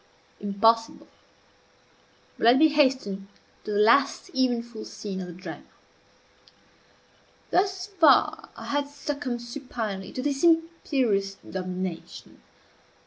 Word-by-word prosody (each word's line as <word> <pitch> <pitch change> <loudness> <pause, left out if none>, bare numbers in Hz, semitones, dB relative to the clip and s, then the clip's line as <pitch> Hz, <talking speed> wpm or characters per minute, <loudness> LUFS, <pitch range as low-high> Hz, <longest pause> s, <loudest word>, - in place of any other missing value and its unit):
Impossible! 225 +3 +1 1.3
but - - -9
let 240 +2 +7
me 315 +2 +6
hasten 260 -10 +1 0.4
to - - -5
the 205 - 0
last 235 +6 +3
eventful 235 -3 -1
scene 195 -3 -6
of 180 - -6
the 175 - -8
drama. 185 +2 -8 1.9
Thus 375 0 +1
far 385 -6 +3
I - - -9
had 285 0 -1
succumbed 285 -4 -4
suginely 235 -6 -5
to 255 - -3
this 280 0 -1
imperious 275 -12 +1
domination. 185 - -6
240 Hz, 105 wpm, -26 LUFS, 200-285 Hz, 1.9 s, let